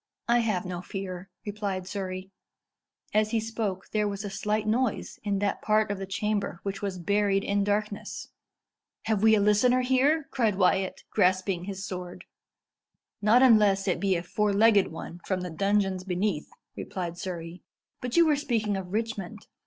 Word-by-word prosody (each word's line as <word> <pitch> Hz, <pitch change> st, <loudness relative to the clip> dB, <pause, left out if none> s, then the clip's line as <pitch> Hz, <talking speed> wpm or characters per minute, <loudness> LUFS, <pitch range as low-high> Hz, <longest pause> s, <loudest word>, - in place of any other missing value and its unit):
"I 240 Hz, +1 st, +4 dB
have 215 Hz, -6 st, 0 dB
no 180 Hz, -1 st, -4 dB
fear," 185 Hz, 0 st, -6 dB, 0.2 s
replied 200 Hz, -3 st, -3 dB
Surrey. 190 Hz, -1 st, -5 dB, 0.8 s
As 215 Hz, 0 st, +3 dB
he 230 Hz, -, +1 dB
spoke, 215 Hz, -4 st, -3 dB
there 210 Hz, -1 st, +1 dB
was 200 Hz, +1 st, -4 dB
a 200 Hz, -, -4 dB
slight 210 Hz, +2 st, -1 dB
noise 230 Hz, +1 st, -1 dB
in 200 Hz, -1 st, 0 dB
that 200 Hz, 0 st, -1 dB
part 215 Hz, -1 st, +2 dB
of 200 Hz, -, -3 dB
the 195 Hz, -, -5 dB
chamber 200 Hz, -2 st, -2 dB
which 195 Hz, -1 st, -4 dB
was 195 Hz, -2 st, -3 dB
buried 200 Hz, +2 st, +1 dB
in 200 Hz, 0 st, +1 dB
darkness. 205 Hz, 0 st, -2 dB, 0.7 s
"Have 220 Hz, -3 st, 0 dB
we 220 Hz, 0 st, +6 dB
a -, -, +3 dB
listener 210 Hz, +5 st, +4 dB
here?" 275 Hz, +4 st, +2 dB
cried 225 Hz, -6 st, +1 dB
Wyat, 190 Hz, 0 st, +1 dB
grasping 185 Hz, -1 st, +1 dB
his 195 Hz, 0 st, -5 dB
sword. 180 Hz, -1 st, -7 dB, 1.0 s
"Not 225 Hz, +5 st, +5 dB
unless 210 Hz, -5 st, +5 dB
it 185 Hz, -, +1 dB
be 195 Hz, -2 st, +2 dB
a 170 Hz, -, -2 dB
four 210 Hz, +3 st, 0 dB
legged 205 Hz, -1 st, +5 dB
one 165 Hz, +1 st, -8 dB
from 185 Hz, -2 st, -1 dB
the 180 Hz, -1 st, -5 dB
dungeons 195 Hz, +1 st, +1 dB
beneath," 185 Hz, -3 st, -1 dB, 0.3 s
replied 175 Hz, -2 st, -5 dB
Surrey. 170 Hz, -1 st, -6 dB, 0.4 s
"But 250 Hz, +2 st, -2 dB
you 340 Hz, -, +7 dB
were 305 Hz, -2 st, +4 dB
speaking 225 Hz, -8 st, 0 dB
of 185 Hz, -2 st, -6 dB
Richmond. 215 Hz, -2 st, -3 dB
200 Hz, 170 wpm, -27 LUFS, 185-215 Hz, 1.0 s, you